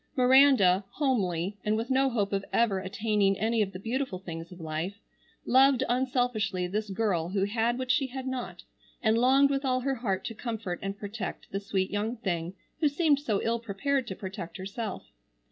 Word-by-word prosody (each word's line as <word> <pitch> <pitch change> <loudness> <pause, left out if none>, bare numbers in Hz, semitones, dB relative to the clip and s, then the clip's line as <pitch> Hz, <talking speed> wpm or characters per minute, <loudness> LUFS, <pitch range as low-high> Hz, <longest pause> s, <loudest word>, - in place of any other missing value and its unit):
Miranda, 255 -8 +6
homely, 200 - 0
and 210 +1 +1
with 230 +4 -3
no 265 +1 +3
hope 205 -5 -1
of 195 0 0
ever 220 -5 +2
attaining 200 +1 +1
any 225 +2 +1
of 195 -2 0
the 185 - -7
beautiful 230 +1 -2
things 165 -2 -8
of 180 - -11
life, 160 +4 -3 0.5
loved 265 0 +5
unselfishly 245 -6 0
this 210 +4 -3
girl 190 -5 0
who 195 +1 0
had 225 +4 0
what 255 -1 -1
she 270 +1 +2
had 260 0 -6
not, 260 -2 -5 0.4
and 220 -1 +4
longed 270 +3 +5
with 275 0 0
all 255 -1 +1
her 270 +1 0
heart 205 -7 -2
to - - -4
comfort 220 -6 -4
and 195 0 -4
protect 205 +1 -6
the 195 - -2
sweet 195 -1 -1
young 215 +4 -2
thing 175 -4 -3 0.2
who 310 - +3
seemed 290 -1 +2
so 220 -9 -1
ill 230 +1 0
prepared 240 +5 -1
to 190 - -4
protect 185 -3 -7
herself. 200 +3 -5
220 Hz, 185 wpm, -28 LUFS, 195-255 Hz, 0.5 s, Miranda